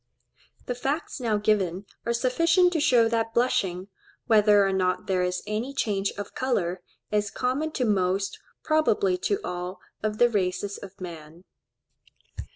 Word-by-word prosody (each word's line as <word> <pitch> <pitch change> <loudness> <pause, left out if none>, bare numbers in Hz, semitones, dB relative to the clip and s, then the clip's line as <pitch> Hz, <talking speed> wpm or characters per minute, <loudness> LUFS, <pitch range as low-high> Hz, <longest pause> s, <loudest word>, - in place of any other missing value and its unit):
The 245 - -2
facts 275 +6 -3
now 225 -4 +1
given 200 -3 0 0.2
are 235 - +2
sufficient 335 +9 +3
to 325 - +1
show 245 -5 +4
that 225 0 -1
blushing, 200 -7 +1 0.4
whether 210 -2 +5
or 195 - 0
not 185 -1 0
there 185 -1 +1
is 180 0 -1
any 220 +6 -3
change 200 -6 0
of 205 0 -6
colour, 190 -9 -1 0.3
is 210 -1 +1
common 260 +8 -1
to 255 - 0
most, 195 -1 0 0.2
probably 370 +5 +2
to 405 +1 0
all, 180 +1 -5 0.2
of 215 0 -2
the 240 - +6
races 200 -2 -1
of 200 -1 -11
man. 165 -2 -9
210 Hz, 150 wpm, -26 LUFS, 190-255 Hz, 0.4 s, the